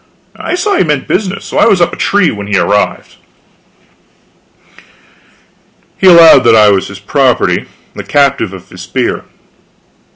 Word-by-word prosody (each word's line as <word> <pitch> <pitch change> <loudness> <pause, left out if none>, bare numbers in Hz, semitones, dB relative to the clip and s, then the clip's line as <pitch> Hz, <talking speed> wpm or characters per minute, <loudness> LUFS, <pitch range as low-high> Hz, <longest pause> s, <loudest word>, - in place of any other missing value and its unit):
I - - -5
saw 395 +2 -1
he - - +2
meant 150 -5 -3
business, 195 0 -3
so - - -6
I - - +4
was 200 -5 +2
up 175 - +1
the - - -8
tree 200 -4 0
when 100 -1 -8
he 100 -1 -1
arrived. 105 +1 -2 2.8
He 190 - +2
allowed 165 -6 +6
that 115 -1 +4
I 105 -1 +4
was 95 -1 -1
his 100 - -11
property, 130 +4 -1 0.3
the - - -8
captive 140 -8 0
of 95 -2 -13
his 90 - -13
spear. 120 +8 -4
135 Hz, 155 wpm, -10 LUFS, -, 2.8 s, allowed